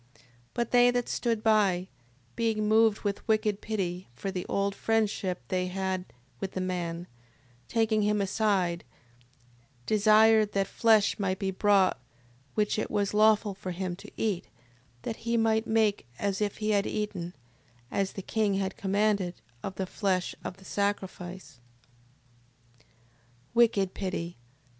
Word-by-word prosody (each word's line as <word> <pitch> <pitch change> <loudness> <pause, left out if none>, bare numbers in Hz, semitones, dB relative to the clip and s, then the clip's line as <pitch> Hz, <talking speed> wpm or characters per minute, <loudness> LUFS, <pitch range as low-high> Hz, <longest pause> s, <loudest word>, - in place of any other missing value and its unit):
6:21. - - -24 0.3
But 235 -1 -1
they 245 0 +6
that 245 -1 0
stood 230 -3 -1
by, 200 -5 +3 0.5
being 220 -2 0
moved 220 -1 +4
with 200 -1 -3
wicked 215 -2 +1
pity, 185 -4 -3
for 195 +10 -4
the 180 -2 -4
old 200 0 0
friendship 205 -4 0
they 185 -1 0
had 190 0 -2 0.3
with 190 - -4
the - - -3
man, 175 -2 -3 0.6
taking 225 -2 +2
him 210 0 +2
aside, 190 -3 +1 1.0
desired 215 0 +5
that 195 0 +2
flesh 220 0 +3
might 190 -2 0
be 195 -1 -1
brought 195 -1 +3 0.6
which 210 0 +1
it - - -2
was 205 -1 0
lawful 215 -1 +4
for 190 -1 -7
him 180 0 -3
to - - -11
eat, 205 -5 -1 0.6
that 225 - -4
he 235 +1 -1
might 225 0 +2
make 220 - +2
as 200 0 -1
if 205 -1 -1
he 215 0 0
had 200 -1 +2
eaten, 190 -5 -3 0.6
as 195 -1 -1
the 195 - -6
king 210 -2 +1
had 195 0 -2
commanded, 200 -2 +1 0.3
of 195 - -5
the 190 - -2
flesh 185 -1 -1
of 180 - -6
the 190 - -17
sacrifice: 190 -7 -3 1.9
Wicked 220 -5 +3
pity... 180 -3 -4
200 Hz, 145 wpm, -29 LUFS, 190-215 Hz, 1.9 s, they